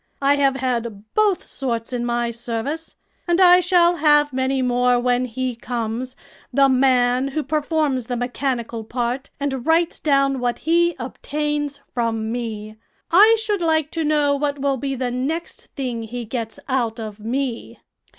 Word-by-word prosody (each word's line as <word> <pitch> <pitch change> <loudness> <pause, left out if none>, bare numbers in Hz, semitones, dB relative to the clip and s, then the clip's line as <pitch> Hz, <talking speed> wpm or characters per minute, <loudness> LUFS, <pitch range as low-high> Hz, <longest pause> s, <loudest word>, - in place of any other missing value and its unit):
I 280 0 +3
have 275 -1 +3
had 235 -5 -3
both 420 -4 +2
sorts 235 -3 -4
in 240 -1 -1
my 240 0 0
service, 240 +7 -4 0.3
and 345 +1 +2
I 360 -1 +8
shall 350 -1 +3
have 295 -2 +4
many 260 0 0
more 245 0 +2
when 245 +1 +1
he 255 +1 -3
comes 240 +2 -4 0.4
the 275 -1 +4
man 255 -1 +3
who 295 +3 -2
performs 300 -5 0
the 245 - -2
mechanical 245 -2 -2
part 245 +4 -3
and 270 -3 -2
writes 330 +1 +2
down 275 -2 +2
what 245 -1 -1
he 345 +1 +2
obtains 290 +2 -3
from 225 -2 -1
me. 220 -3 -5 0.3
I 425 +6 +7
should 420 -3 -1
like 315 -2 +1
to 330 - -2
know 295 -2 +2
what 285 0 -1
will 275 -1 0
be 270 +1 -3
the 250 -1 -2
next 285 +7 -4
thing 250 -5 -3
he 235 +2 -6
gets 225 -1 -5
out 240 -4 -1
of 215 -1 -7
me." 240 +2 -3
260 Hz, 160 wpm, -21 LUFS, 240-295 Hz, 0.4 s, I